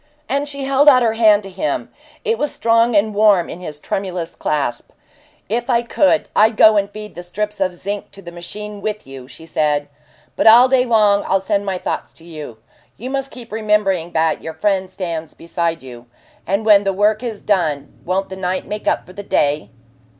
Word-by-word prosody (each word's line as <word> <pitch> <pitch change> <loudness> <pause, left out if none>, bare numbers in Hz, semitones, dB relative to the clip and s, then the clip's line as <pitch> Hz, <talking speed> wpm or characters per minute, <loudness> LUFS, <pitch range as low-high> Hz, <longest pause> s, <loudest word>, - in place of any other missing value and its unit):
And 280 +2 -1
she 280 -1 -5
held 275 +2 +5
out 255 -3 +5
her 225 -1 +2
hand 215 -2 +4
to 195 - -8
him; 195 +12 -3 0.3
it 455 0 0
was 295 - -1
strong 230 0 +2
and 210 +1 +2
warm 205 -4 +4
in - - -8
his 155 -5 -7
tremulous 180 -1 -4
clasp. 140 -5 -2 0.6
"If 240 +5 -2
I 240 -1 +2
could, 240 -1 +2
I'd 215 +1 +4
go 215 0 +7
and 200 -1 +1
feed 210 +1 -9
the 175 - -8
strips 210 +4 -4
of 185 -2 0
zinc 200 +3 -5
to 195 - -12
the 170 - -9
machine 205 +4 -7
with 215 +1 -4
you," 135 -2 -11
she 135 +5 -12
said. 150 -2 0 0.5
"But - - +2
all 240 +3 +9
day 255 -1 +3
long 210 -4 +3
I'll 195 - +2
send 200 +1 -1
my 190 -1 -1
thoughts - - -4
to 165 - -13
you. 150 -8 -9 0.4
You 255 +4 -6
must 270 0 -2
keep 240 -4 -11
remembering 210 -5 0
that 160 -1 +1
your 160 -1 -7
friend 190 +2 0
stands 170 -4 -5
beside 165 -1 -3
you. 120 -2 -11 0.4
And 200 +4 0
when 205 -2 +6
the 195 -1 0
work 210 +3 +2
is 230 -4 -5
done 155 -9 -1
won't 190 +2 -1
the 190 - -6
night 185 0 -2
make 210 +1 -6
up - - +1
for 185 - -14
the 205 - -7
day?" 145 - 0
200 Hz, 205 wpm, -19 LUFS, 170-220 Hz, 0.6 s, all